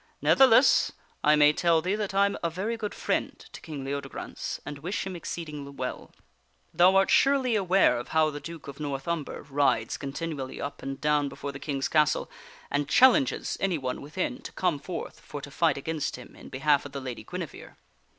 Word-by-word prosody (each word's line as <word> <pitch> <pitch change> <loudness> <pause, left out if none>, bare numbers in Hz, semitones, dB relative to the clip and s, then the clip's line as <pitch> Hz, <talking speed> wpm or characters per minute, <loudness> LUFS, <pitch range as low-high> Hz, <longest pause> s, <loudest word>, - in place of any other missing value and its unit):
Ne'theless, 260 -1 +5 0.3
I 150 +1 +6
may 150 0 +6
tell 170 0 +3
thee 180 +4 -1
that 205 -2 -2
I 200 +1 +5
am 200 - -1
a 170 - 0
very 195 +8 -3
good 215 -2 -5
friend - - -1
to - - -13
King 145 -4 -7
Leodegrance 140 +1 -5
and 145 -1 -6
wish 180 +7 -3
him 190 -1 -5
exceeding 150 -5 -6
well. 125 -1 -5 0.6
Thou 185 +2 +5
art 195 0 +4
surely 270 -4 +4
aware 190 - +3
of 120 - -7
how 155 -1 +2
the 145 - -6
Duke 165 0 -9
of 140 +1 -9
North 140 -1 -4
Umber 170 -3 -3
rides 140 -5 +1
continually 140 -1 -5
up 140 - -5
and 135 0 -5
down 150 -1 +2
before 140 - -6
the 135 - -9
King's 140 -3 -2
castle, 150 -2 +2 0.4
and 145 0 0
challenges 260 - +4
anyone 155 -10 -1
within 185 - -3
to - - -8
come 175 -6 0
forth 170 +3 -6
for 145 - -8
to 140 0 -9
fight 160 -1 +2
against 155 +2 -3
him 125 - -12
in - - -12
behalf 145 +2 +2
of 145 - -10
the 140 - -3
Lady 130 -3 -6
Guinevere. - - -7
150 Hz, 190 wpm, -27 LUFS, 140-185 Hz, 0.6 s, I